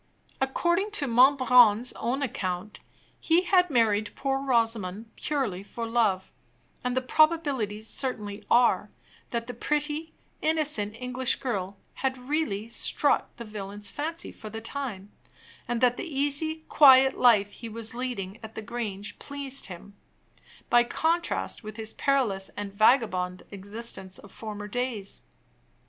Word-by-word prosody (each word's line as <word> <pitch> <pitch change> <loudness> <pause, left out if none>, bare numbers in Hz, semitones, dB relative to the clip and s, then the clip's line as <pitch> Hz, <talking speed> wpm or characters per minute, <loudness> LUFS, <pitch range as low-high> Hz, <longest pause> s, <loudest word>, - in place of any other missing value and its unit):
According 345 +9 +1
to 295 - +1
Monbrun's 250 -2 +5
own 265 +4 -2
account, 185 -4 -4 0.4
he 335 +2 +3
had 360 -1 +3
married 220 -5 +2
poor 270 -1 -1
Rosamond 225 -5 0
purely 255 -11 -2
for 230 +3 -6
love; 225 -5 0 0.5
and 250 0 -1
the - - +3
probabilities 270 -9 +1
certainly 210 -6 -3
are, 240 0 +4 0.4
that 235 -1 -2
the 245 - -6
pretty, 300 +5 -2 0.3
innocent 300 -10 +1
English 250 +1 +1
girl 200 -6 -3 0.2
had 265 0 -2
really 250 -6 -2
struck 230 - 0
the 235 - -8
villain's 205 -1 -4
fancy 325 +3 -4
for 215 - -10
the 225 +1 -6
time; 225 -5 -4 0.6
and 240 0 -2
that 245 -1 +4
the - - -4 0.2
easy, 315 +3 +1
quiet 265 -2 +7
life 210 -5 +4
he 230 +2 -9
was 225 0 -5
leading 230 -5 -4
at 220 0 -10
the 220 - -6
Grange 210 -3 -5
pleased 280 -1 -3
him, 195 +2 -11 0.7
by 240 0 +5
contrast 330 +5 -1
with 215 0 -8
his 220 -1 -4
perilous 235 -9 +1
and 205 -1 -5
vagabond 200 -5 +2
existence 200 -1 -4
of 200 - -14
former 210 -2 -7
days. 225 -3 -2
235 Hz, 135 wpm, -27 LUFS, 205-275 Hz, 0.7 s, quiet